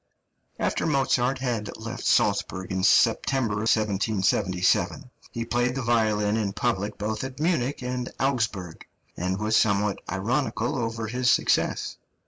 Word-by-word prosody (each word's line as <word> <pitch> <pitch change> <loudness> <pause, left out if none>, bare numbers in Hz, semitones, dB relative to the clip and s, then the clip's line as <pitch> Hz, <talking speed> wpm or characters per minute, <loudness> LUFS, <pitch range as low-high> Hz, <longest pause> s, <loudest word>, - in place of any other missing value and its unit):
} - - -47
(317) - - -36
After - - -1 0.4
Mozart 130 +3 +1
had 120 -5 -3
left - - -6
Salzburg 95 -1 +1
in 95 0 -1
September, 115 +2 +3
1777, 100 +1 +1 0.2
he 115 0 -4
played 120 +1 0
the 135 - -2
violin 110 -3 +2
in 100 -3 -1
public 105 -2 -1
both 105 +2 -3
at 130 +1 -7
Munich 145 -6 0
and 125 0 -3
Augsburg, 110 -10 -2 0.3
and 95 +2 -2
was 105 +2 0
somewhat 100 -1 +2
ironical 115 +4 -1
over 115 -2 -2
his 125 +2 0
success. - - +1
110 Hz, 135 wpm, -26 LUFS, 100-125 Hz, 0.4 s, September